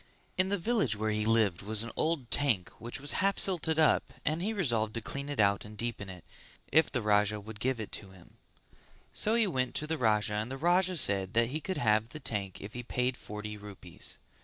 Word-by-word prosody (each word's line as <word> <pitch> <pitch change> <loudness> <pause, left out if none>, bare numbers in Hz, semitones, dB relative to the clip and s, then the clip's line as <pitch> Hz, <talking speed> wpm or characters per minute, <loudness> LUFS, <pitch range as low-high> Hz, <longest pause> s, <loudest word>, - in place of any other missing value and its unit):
In 185 +1 +2
the 200 - +1
village 200 - +1
where 110 +1 -1
he 105 0 0
lived 110 -6 +3
was 110 +2 +1
an 115 - -6
old 155 -7 -1
tank 110 -12 +2
which 120 +3 -5
was 145 +1 0
half 195 0 +2
silted 165 -4 +1
up 160 -1 +3
and 155 +2 0
he 205 +4 0
resolved 120 - 0
to - - 0
clean 140 +5 -5
it 145 - -4
out 100 -1 +3
and 105 0 -11
deepen 115 -3 -4
it, 90 -2 -10 0.5
if 160 0 +4
the 120 -4 -1
Raja 105 0 +3
would 105 +1 -10
give 130 +1 0
it 110 - -5
to 100 - -14
him; 95 -2 -17 0.8
so 215 +2 +2
he 230 -1 +4
went 130 -9 -1
to 150 - 0
the 160 0 -2
Raja 105 -2 +2
and 105 +3 -1
the 135 - -5
Raja 180 +4 +3
said 100 -7 +2
that 115 0 +4
he 155 +4 -3
could 190 +2 -3
have 110 0 +2
the 155 - -8
tank 100 -8 -3
if 100 +2 -8
he 125 - -4
paid 125 +1 -1
forty 105 -1 -7
rupees. 105 -2 -7
115 Hz, 225 wpm, -31 LUFS, 105-155 Hz, 0.8 s, if